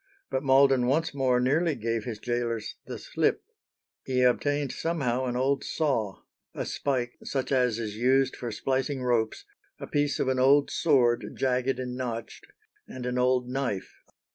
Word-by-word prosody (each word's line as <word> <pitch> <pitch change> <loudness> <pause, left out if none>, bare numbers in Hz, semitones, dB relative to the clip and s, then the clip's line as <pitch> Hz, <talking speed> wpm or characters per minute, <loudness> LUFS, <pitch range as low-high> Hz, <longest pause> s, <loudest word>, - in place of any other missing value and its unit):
But 130 - 0
Malden 135 -2 +4
once 160 +5 +1
more 130 -3 +2
nearly 150 +5 +2
gave 115 -1 -2
his 115 -4 -4
gaolers 115 -1 -2
the - - -5
slip. - - 0 0.6
He 130 -1 +1
obtained 145 +3 +1
somehow 130 -7 -1
an 125 -1 -2
old 135 +2 +1
saw, 120 -11 -1 0.3
"a - - -3
spike 125 -3 -2
such 135 -1 -3
as 125 -4 +2
is 110 -2 -4
used 130 +2 +2
for 120 -2 -5
splicing 130 +3 -1
ropes, 115 -3 0 0.3
a - - -5
piece 145 -1 0
of - - 0
an 130 -1 +1
old 140 +2 +4
sword 125 -7 +2
jagged 130 0 0
and 125 -1 -4
notched, 120 -3 -5 0.4
and 130 -1 -7
an 125 0 -1
old 125 0 +2
knife." 125 -7 -3
130 Hz, 160 wpm, -27 LUFS, 120-135 Hz, 0.6 s, Malden